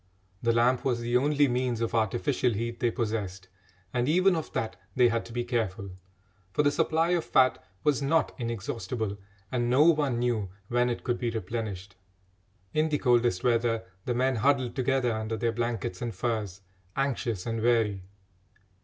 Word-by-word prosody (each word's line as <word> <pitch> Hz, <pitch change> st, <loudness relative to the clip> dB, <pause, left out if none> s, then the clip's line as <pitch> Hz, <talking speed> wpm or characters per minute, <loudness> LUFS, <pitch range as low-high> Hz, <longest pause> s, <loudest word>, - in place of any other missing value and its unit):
The 115 Hz, -, +2 dB
lamp 120 Hz, +2 st, +3 dB
was 125 Hz, -3 st, +1 dB
the 120 Hz, +1 st, -1 dB
only 145 Hz, +2 st, +3 dB
means 125 Hz, -2 st, 0 dB
of 115 Hz, -1 st, -1 dB
artificial 120 Hz, +3 st, +1 dB
heat 115 Hz, +2 st, -3 dB
they 120 Hz, -, +2 dB
possessed, 105 Hz, -5 st, -3 dB, 0.4 s
and 125 Hz, +2 st, +1 dB
even 185 Hz, +3 st, +4 dB
of 160 Hz, -, -4 dB
that 110 Hz, -, -2 dB, 0.2 s
they 125 Hz, -2 st, +5 dB
had 115 Hz, 0 st, 0 dB
to -, -, -11 dB
be 120 Hz, +1 st, -2 dB
careful, 110 Hz, -5 st, -2 dB, 0.6 s
for 150 Hz, -, +2 dB
the 145 Hz, -, +4 dB
supply 160 Hz, +3 st, +1 dB
of 175 Hz, -2 st, +2 dB
fat 130 Hz, 0 st, +3 dB, 0.2 s
was 145 Hz, -2 st, +2 dB
not 160 Hz, +4 st, +2 dB
inexhaustible, 115 Hz, -2 st, -3 dB, 0.3 s
and 120 Hz, -1 st, 0 dB
no 130 Hz, +4 st, +5 dB
one 150 Hz, -6 st, +3 dB
knew 120 Hz, -5 st, 0 dB, 0.2 s
when 120 Hz, 0 st, +2 dB
it 120 Hz, -, -3 dB
could 120 Hz, -2 st, -1 dB
be 120 Hz, -, 0 dB
replenished. 105 Hz, -3 st, -5 dB, 0.8 s
In 155 Hz, +1 st, +2 dB
the 150 Hz, -, +1 dB
coldest 120 Hz, -8 st, +2 dB
weather 115 Hz, -2 st, +2 dB, 0.2 s
the 120 Hz, -, -1 dB
men 130 Hz, 0 st, +1 dB
huddled 130 Hz, 0 st, +2 dB
together 130 Hz, -2 st, +1 dB
under 110 Hz, 0 st, -3 dB
their 115 Hz, +1 st, 0 dB
blankets 115 Hz, -5 st, -3 dB
and 115 Hz, -4 st, -3 dB
furs, 105 Hz, -3 st, -2 dB, 0.3 s
anxious 125 Hz, -7 st, -1 dB
and 115 Hz, -1 st, -2 dB
weary. 110 Hz, -4 st, +2 dB
120 Hz, 170 wpm, -28 LUFS, 115-130 Hz, 0.8 s, they